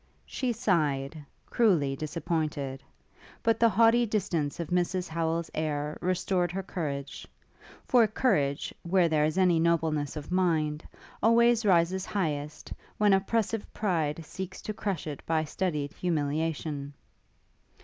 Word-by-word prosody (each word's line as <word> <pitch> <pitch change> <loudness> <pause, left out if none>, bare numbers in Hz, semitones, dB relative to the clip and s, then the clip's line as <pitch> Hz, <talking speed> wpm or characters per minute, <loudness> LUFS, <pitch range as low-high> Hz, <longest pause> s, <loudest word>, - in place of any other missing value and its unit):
She 255 -2 -2
sighed, 155 - 0 0.2
cruelly 170 - +2
disappointed; 150 -3 -3 0.6
but 225 -1 +2
the 230 - +5
haughty 230 +2 +5
distance 175 -9 -1
of 170 - -4
Mrs 180 +1 0
Howel's 165 0 -2
air 150 -1 -2
restored 180 0 0
her 195 +2 -3
courage; 145 -7 -5 0.6
for 240 -3 +5
courage, 150 - 0
where 175 0 +3
there 155 -2 +2
is 155 +3 -1
any 180 -3 +4
nobleness 160 -3 +1
of 150 +2 -7
mind, 160 -4 +1 0.4
always 230 0 +4
rises 180 +1 +3
highest, 150 -6 -3 0.2
when 210 -1 +4
oppressive 210 +2 0
pride 165 -6 -1
seeks 190 +3 -7
to 215 - -3
crush 200 -5 -3
it 150 -3 -6
by 160 -1 +1
studied 150 -3 -2
humiliation. 150 -3 -2
170 Hz, 125 wpm, -28 LUFS, 150-195 Hz, 0.6 s, the